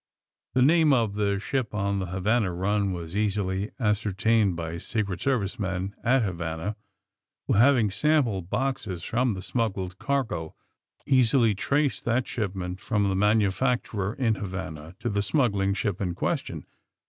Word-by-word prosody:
The 130 - +5
name 155 +1 +5
of 115 -5 +2
the 100 -1 0
ship 120 +1 -2
on 100 -1 0
the 95 - -3
Havana 95 +3 +1
run 100 +3 0
was 85 0 -5
easily 100 -1 0
ascertained 105 -2 +2
by 85 0 -4
Secret 100 -3 -3
Service 120 -4 0
men 95 -1 -2
at 125 +1 +3
Havana 85 +1 -3 0.7
who, - - +1
having 120 -1 +4
sample 130 -5 +2
boxes 110 -2 -3
from 120 -2 0
the 95 - -6
smuggled 95 -6 -2
cargo, 125 - -2 0.5
easily 125 -4 +4
traced 140 +8 0
that 120 +2 +1
shipment 95 -4 -3
from 105 -3 0
the 95 - 0
manufacturer 105 +1 +1
in 120 -4 +1
Havana 90 -5 -6
to - - -4
the 100 -2 0
smuggling 100 -5 +1
ship 100 -2 -2
in 90 -3 -1
question. - - -2
105 Hz, 145 wpm, -26 LUFS, 95-120 Hz, 0.7 s, The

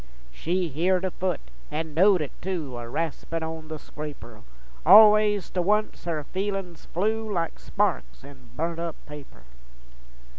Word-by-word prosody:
She 175 - -1
heered 180 +6 +1
a 185 - -1
foot, 185 -2 -2 0.3
an' 155 +1 -4
knowed 185 +2 +5
it 145 - -4
tu, 165 -9 -3
A 120 -1 -7
raspin' 165 +3 -3
on 160 0 -6
the 155 0 -5
scraper, 145 -8 -9 0.4
All 210 +5 +10
ways 210 -2 +1
to 180 - 0
once, 210 +2 0
her 160 -3 -2
feelins 190 0 -4
flew 220 +4 -1
Like 170 -4 -2
sparks 200 -8 -1
in 135 -2 -14
burnt 165 +1 -2
up 170 -2 -3
paper. 145 - -12
170 Hz, 150 wpm, -26 LUFS, 150-190 Hz, 0.4 s, All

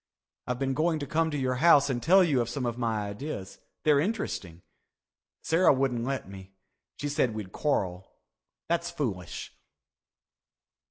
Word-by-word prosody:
I've 125 - -1
been 135 0 -1
going 160 +3 +1
to 145 - -4
come 160 +2 +1
to 150 - -3
your 130 -2 0
house 150 -4 +6
and 125 -3 -1
tell 185 +6 +6
you 145 -8 +2
of 120 - -2
some 125 +1 -3
of 120 -1 -1
my 110 -4 -1
ideas. 100 -2 -6 0.2
They're 150 -2 +4
interesting. 140 - -3 0.8
Sarah 165 +3 +4
wouldn't 130 -3 0
let 135 -4 -3
me. 95 0 -11 0.4
She 145 - -3
said 130 -6 0
we'd 105 -4 -6
quarrel. 95 -11 -1 0.6
That's 170 0 0
foolish." 115 - -4
135 Hz, 155 wpm, -28 LUFS, 110-155 Hz, 0.8 s, house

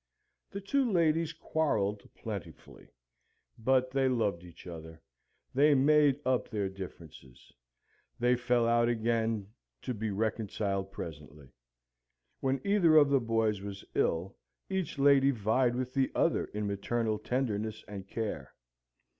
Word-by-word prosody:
The 200 - -6
two 255 +4 +1
ladies 165 -2 +2
quarrelled 110 -11 -1
plentifully; - - -8 0.7
but 130 +2 +2
they 135 0 +2
loved 105 -8 0
each 85 -2 -14
other: 80 -2 -9 0.5
they 145 +2 +5
made 145 0 +4
up 130 -1 +1
their 100 -3 -2
differences: 80 -9 -11 0.6
they 120 +1 +3
fell 120 -1 +1
out 120 0 +3
again, 110 -3 -1 0.3
to 125 - -2
be 110 0 -3
reconciled 100 -2 -2
presently. 75 -6 -9 0.9
When 135 0 0
either 195 -6 +4
of 145 -2 +6
the 140 -1 +4
boys 115 -3 0
was 100 -1 -7
ill, 90 +4 0 0.4
each 190 -6 -2
lady 140 -1 +5
vied 120 +1 +1
with 130 0 -3
the 135 -1 +1
other - - +2
in 105 0 -4
maternal 110 +2 -1
tenderness 110 -3 -2
and 100 -2 -8
care. 100 - -5
115 Hz, 130 wpm, -31 LUFS, 100-135 Hz, 0.9 s, of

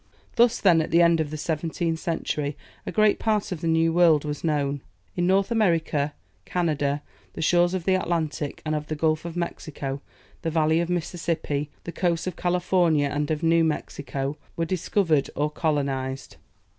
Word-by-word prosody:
Thus 240 -1 +4
then, 170 -5 +5
at 160 - -3
the 170 +1 +5
end 170 -1 +4
of 155 -2 -1
the 155 - -5
seventeenth 160 +1 -2
century, 150 -3 -2 0.3
a - - -2
great 215 -1 +3
part 215 -3 0
of 170 -3 -4
the 165 - -1
new 165 0 +3
world 165 -4 +5
was 150 -1 -4
known. 145 -3 0 0.3
In 175 - +1
North 195 +3 +2
America, 165 -9 +1 0.3
Canada, 145 - -1 0.3
the - - -6
shores 175 +2 +3
of 185 - -3
the 190 - +3
Atlantic 160 -5 -2
and 155 - -1
of 150 0 -2
the 155 - -3
Gulf 155 +1 0
of 170 0 -5
Mexico, 145 -5 -4 0.4
the 165 - -1
valley 160 0 +2
of 170 - 0
the 180 - 0
Mississippi, 160 -4 -2
the 170 - -5
coasts 170 -2 0
of 185 -3 -3
California 175 -4 +2
and 145 +1 -2
of 155 +1 -1
New 165 0 +4
Mexico, 145 -2 -3 0.2
were 165 - -1
discovered 165 -3 +1
or 150 +1 0
colonized. 140 -4 -2
160 Hz, 180 wpm, -25 LUFS, 150-175 Hz, 0.4 s, then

